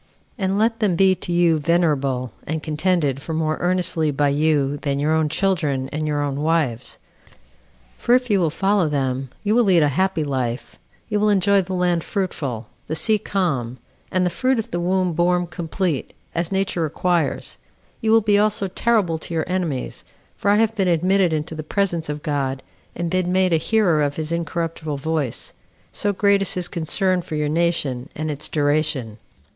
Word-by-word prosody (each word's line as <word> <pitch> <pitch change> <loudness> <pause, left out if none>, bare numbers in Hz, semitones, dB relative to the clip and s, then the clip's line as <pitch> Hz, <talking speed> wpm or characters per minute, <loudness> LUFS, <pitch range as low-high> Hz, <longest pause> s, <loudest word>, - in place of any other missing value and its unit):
And 195 -3 -1
let 225 +2 +1
them 205 -6 +2
be 190 +2 +5
to 175 -1 -6
you 170 -2 +3
venerable, 140 -6 +1 0.2
and 155 0 -3
contended 155 -3 0
for 160 +2 -4
more 155 -1 0
earnestly 175 -3 +1
by 145 0 +1
you 145 -1 +1
than 140 -1 -2
your 150 +2 +1
own 160 -1 +2
children 155 -7 0
and 155 +1 -3
your 145 -1 0
own 140 0 -2
wives; 150 -7 0 1.0
for 240 - +4
if 250 0 +1
you 205 -4 +2
will 170 -3 +2
follow 195 +1 +1
them, 135 -2 -1
you 210 0 +1
will 240 +1 +4
lead 180 -6 +4
a 145 - +3
happy 185 +2 0
life 130 -4 -3 0.3
you 210 -2 0
will 210 +1 +3
enjoy 200 0 +4
the 185 0 -4
land 175 -2 +1
fruitful, 140 - -3 0.2
the 155 - -2
sea 215 +6 +1
calm, 135 - -1 0.3
and 185 -1 +2
the 180 - 0
fruit 255 +7 +1
of 225 - -3
the 175 - -1
womb 180 0 +1
born 175 +2 +2
complete, 170 -2 -3 0.2
as 170 +1 -2
nature 190 -2 0
requires; 165 -1 -1 0.4
you 220 - 0
will 225 +1 +6
be 205 -1 +3
also 210 -1 +1
terrible 190 -5 +1
to 165 - -6
your 160 - 0
enemies 175 -8 -3 0.3
for 200 - -1
I 205 - +5
have 225 +1 +2
been 195 -3 +1
admitted 180 +2 +3
into 155 +1 -2
the 155 - -5
presence 170 -1 -1
of 150 0 -4
God 135 -3 -2 0.3
and 170 -1 -3
been 185 -1 0
made 185 -1 +2
a - - +5
hearer 175 -3 +2
of 145 -1 0
his 155 0 -4
incorruptible 165 -2 -3
voice 150 -3 -2 0.4
so 205 - -1
great 200 0 +3
is 195 - 0
his 180 -1 -1
concern 180 +2 0
for 165 -2 -6
your 150 -1 0
nation, 150 -6 0
and 155 0 -2
its 145 0 -5
duration." 145 -6 0
165 Hz, 185 wpm, -22 LUFS, 150-190 Hz, 1.0 s, will